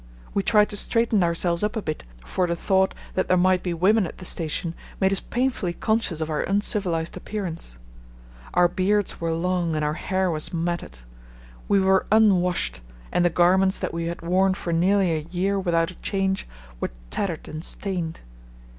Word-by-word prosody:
We 200 Hz, -, +2 dB
tried 210 Hz, +1 st, +4 dB
to 205 Hz, -, 0 dB
straighten 225 Hz, -2 st, +2 dB
ourselves 170 Hz, 0 st, +1 dB
up 210 Hz, +2 st, 0 dB
a 220 Hz, -, -1 dB
bit, 155 Hz, -1 st, -4 dB, 0.2 s
for 180 Hz, -, 0 dB
the 170 Hz, -, 0 dB
thought 190 Hz, +2 st, +1 dB, 0.2 s
that 185 Hz, -, 0 dB
there 185 Hz, -, +3 dB
might 185 Hz, 0 st, +3 dB
be 180 Hz, -, -2 dB
women 190 Hz, +4 st, +3 dB
at -, -, -10 dB
the 185 Hz, -, -8 dB
station 165 Hz, 0 st, -1 dB, 0.3 s
made 190 Hz, 0 st, +3 dB
us 195 Hz, -, +2 dB
painfully 245 Hz, -8 st, -1 dB
conscious 220 Hz, -6 st, 0 dB
of 155 Hz, -, -2 dB
our 150 Hz, -, 0 dB
uncivilized 195 Hz, -5 st, -1 dB
appearance. 170 Hz, -, -4 dB, 0.8 s
Our 175 Hz, 0 st, +6 dB
beards 190 Hz, +3 st, 0 dB
were 165 Hz, 0 st, 0 dB
long 170 Hz, 0 st, 0 dB
and 155 Hz, -1 st, 0 dB
our 150 Hz, -, 0 dB
hair 185 Hz, +2 st, -1 dB
was 155 Hz, +1 st, -1 dB
matted. 170 Hz, -, -3 dB, 0.7 s
We 200 Hz, -, +4 dB
were 190 Hz, 0 st, +3 dB
unwashed 185 Hz, -, +3 dB, 0.3 s
and 175 Hz, -, +2 dB
the 175 Hz, -, +4 dB
garments 185 Hz, +3 st, +3 dB
that -, -, -3 dB
we 165 Hz, 0 st, -2 dB
had 170 Hz, 0 st, -5 dB
worn 185 Hz, +2 st, +2 dB
for 170 Hz, -3 st, -3 dB
nearly 185 Hz, +2 st, +3 dB
a 160 Hz, -, 0 dB
year 190 Hz, +3 st, 0 dB
without 170 Hz, -2 st, +1 dB
a 185 Hz, -, -15 dB
change 195 Hz, -1 st, -1 dB, 0.3 s
were -, -, -2 dB, 0.2 s
tattered 175 Hz, -6 st, -3 dB
and 155 Hz, +1 st, -6 dB
stained. 175 Hz, -5 st, -3 dB
180 Hz, 180 wpm, -24 LUFS, 170-195 Hz, 0.8 s, Our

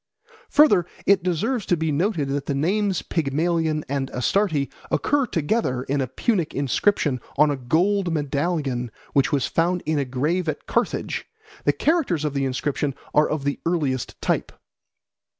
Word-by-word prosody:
Further, 210 Hz, -, +5 dB, 0.2 s
it 200 Hz, -1 st, +5 dB
deserves 200 Hz, +7 st, -1 dB
to 175 Hz, -, +2 dB
be 160 Hz, -1 st, 0 dB
noted 160 Hz, -2 st, 0 dB
that 140 Hz, 0 st, -2 dB
the 140 Hz, -, 0 dB
names 190 Hz, +5 st, +1 dB
Pygmalion 160 Hz, +1 st, 0 dB
and 135 Hz, -1 st, -2 dB
Astarte 150 Hz, -, +1 dB, 0.2 s
occur 285 Hz, -3 st, +1 dB
together 150 Hz, -, 0 dB
in 140 Hz, +1 st, -1 dB
a 130 Hz, -, -1 dB
Punic 180 Hz, -, -1 dB
inscription 140 Hz, -, +1 dB, 0.2 s
on 150 Hz, +1 st, +5 dB
a -, -, 0 dB
gold 175 Hz, +9 st, +1 dB
medallion 145 Hz, -4 st, -1 dB, 0.2 s
which 140 Hz, -, +3 dB
was 140 Hz, -3 st, +1 dB
found 175 Hz, +2 st, 0 dB
in 155 Hz, -1 st, +1 dB
a 140 Hz, -, 0 dB
grave 155 Hz, +7 st, -1 dB
at 150 Hz, -, -4 dB
Carthage; -, -, -1 dB, 0.4 s
the -, -, +5 dB
characters 280 Hz, -, +1 dB
of 150 Hz, -, -1 dB
the 140 Hz, -1 st, 0 dB
inscription 135 Hz, +1 st, -1 dB, 0.2 s
are 150 Hz, -, +4 dB
of 155 Hz, -2 st, -2 dB
the 140 Hz, 0 st, -1 dB
earliest 145 Hz, -7 st, -1 dB
type. -, -, 0 dB
155 Hz, 155 wpm, -23 LUFS, 140-180 Hz, 0.4 s, Further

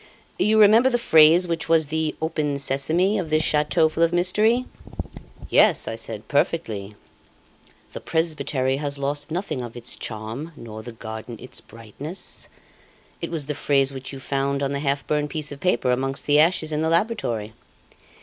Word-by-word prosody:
You 220 Hz, +1 st, +3 dB
remember 220 Hz, +5 st, +6 dB
the 240 Hz, -, +1 dB
phrase 165 Hz, -4 st, +6 dB
which 165 Hz, -1 st, -3 dB
was 160 Hz, -3 st, +3 dB
the 160 Hz, 0 st, -1 dB
'open 155 Hz, -3 st, -1 dB
sesame' 160 Hz, +9 st, +1 dB
of 170 Hz, -4 st, -4 dB
this 155 Hz, 0 st, +2 dB
chateau 150 Hz, +2 st, +3 dB
full 155 Hz, +1 st, -4 dB
of 165 Hz, 0 st, +4 dB
mystery?" 210 Hz, +8 st, +2 dB, 0.8 s
"Yes," -, -, +4 dB
I -, -, -2 dB
said, 110 Hz, -1 st, -7 dB
"perfectly, 110 Hz, -9 st, -1 dB, 1.0 s
'The -, -, -7 dB
presbytery 150 Hz, -5 st, -1 dB
has 145 Hz, -1 st, -3 dB
lost 145 Hz, +1 st, -2 dB
nothing 170 Hz, -5 st, -3 dB
of 120 Hz, 0 st, -8 dB
its 120 Hz, -, -5 dB
charm, 115 Hz, +9 st, -6 dB
nor 110 Hz, -4 st, -9 dB
the 120 Hz, -, -8 dB
garden 110 Hz, +1 st, -8 dB
its 125 Hz, -, -9 dB
brightness.' 115 Hz, -, -9 dB, 0.7 s
It -, -, -3 dB
was 160 Hz, -4 st, -2 dB
the 150 Hz, -, -3 dB
phrase 140 Hz, -1 st, +1 dB
which 130 Hz, -1 st, -7 dB
you 135 Hz, -, -8 dB
found 140 Hz, +1 st, -1 dB
on 135 Hz, -, -1 dB
the 140 Hz, -, -2 dB
half 140 Hz, -1 st, -1 dB
burned 150 Hz, -1 st, 0 dB
piece 150 Hz, -1 st, -3 dB
of 140 Hz, -, -8 dB
paper 130 Hz, -8 st, +1 dB
amongst 135 Hz, +2 st, -1 dB
the 145 Hz, 0 st, +4 dB
ashes 160 Hz, 0 st, +3 dB
in 150 Hz, 0 st, -1 dB
the 160 Hz, -, +1 dB
laboratory." 165 Hz, -, -1 dB
150 Hz, 170 wpm, -23 LUFS, 130-165 Hz, 1.0 s, remember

